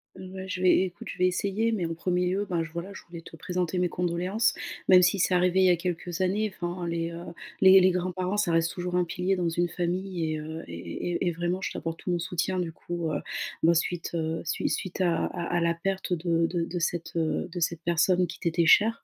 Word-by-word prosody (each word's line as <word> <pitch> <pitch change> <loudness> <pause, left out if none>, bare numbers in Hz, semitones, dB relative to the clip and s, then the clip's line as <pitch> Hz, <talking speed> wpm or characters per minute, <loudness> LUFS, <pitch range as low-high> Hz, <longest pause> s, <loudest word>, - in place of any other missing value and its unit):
Ouais 190 0 -8
je 185 -1 -4
vais, 185 0 +5
écoute, 185 -2 -6
je - - -7
vais 180 - +3
essayer, 200 +5 +1
mais 180 -6 -1
en 165 - -4
premier 180 +1 0
lieu, 200 +2 0
ben 175 -3 0
j 165 - -7
voilà, 175 +4 -6
je - - -9
voulais 170 -1 -8
te 165 - -12
présenter 180 +1 -2
mes 180 -1 +1
condoléances, 180 +5 0 0.3
même 180 -1 +8
si 185 +2 +3
c'est 185 - +2
arrivé 180 +1 +3
il 185 - +5
y - - +6
a - - +5
quelques 175 +1 -3
années, 200 +2 0
enfin 175 0 -4
les, 165 0 -1
heu, 170 0 -7 0.4
les 190 0 +9
les 185 - +6
grands-parents, 185 +2 -1
ça 200 -5 +2
reste 165 0 +2
toujours 180 0 -3
un 180 -1 +3
pilier 185 +2 0
dans 175 -2 0
une 175 +1 0
famille 175 -1 -2
et 155 - -3
heu, 160 +1 -6
et 85 - -9
et 85 - -5
et 180 - 0
et - - 0
vraiment 175 +3 -2
je - - -3
t'apporte 165 0 -4
tout 180 - -3
mon 175 - +1
soutien 175 +1 -1
du 170 -2 -2
coup, 170 -1 -4
heu, 145 - -2 0.4
ben 170 +1 +6
suite, 170 +1 -1
heu, 160 0 -2
sui - - -1
suite 185 0 -3
à 175 -2 +2
à 175 -2 -4
à - - +3
la 170 0 +2
perte 190 +1 -2
de 170 -1 +1
de 170 0 -1
de 175 +1 -4
cette, 170 0 -2
heu, 160 -1 0
de 180 - -4
cette 165 0 -1
personne 175 +2 +2
qui - - -9
t'était 170 0 +1
chère. 225 +6 +5
175 Hz, 250 wpm, -27 LUFS, 170-185 Hz, 0.4 s, les